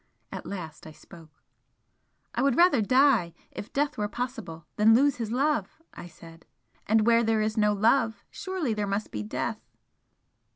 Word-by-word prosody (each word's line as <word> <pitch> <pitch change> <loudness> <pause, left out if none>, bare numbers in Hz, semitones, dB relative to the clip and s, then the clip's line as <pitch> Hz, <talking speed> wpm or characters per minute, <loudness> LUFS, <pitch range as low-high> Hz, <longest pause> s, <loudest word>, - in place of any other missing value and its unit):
At - - -7
last 160 -6 -8
I 155 - -11
spoke 165 0 -16 1.0
"I - - -1
would 275 -2 +2
rather 345 -8 +5
die, 240 - +3 0.2
if 205 - -9
death 285 -3 -1
were 210 - 0
possible, 210 -9 -6
than 220 +2 +5
lose 280 +2 +3
his 230 -3 -4
love" 270 -2 -1
I - - -10
said 165 -1 -16 0.4
"And 215 0 +3
where 235 0 +4
there 220 -1 +1
is 215 0 -2
no 210 -2 +2
love, 220 0 +1
surely 375 - -3
there 210 -1 -2
must 200 +2 -3
be 105 - -4
death?" 105 - -4
220 Hz, 165 wpm, -27 LUFS, 195-255 Hz, 1.0 s, rather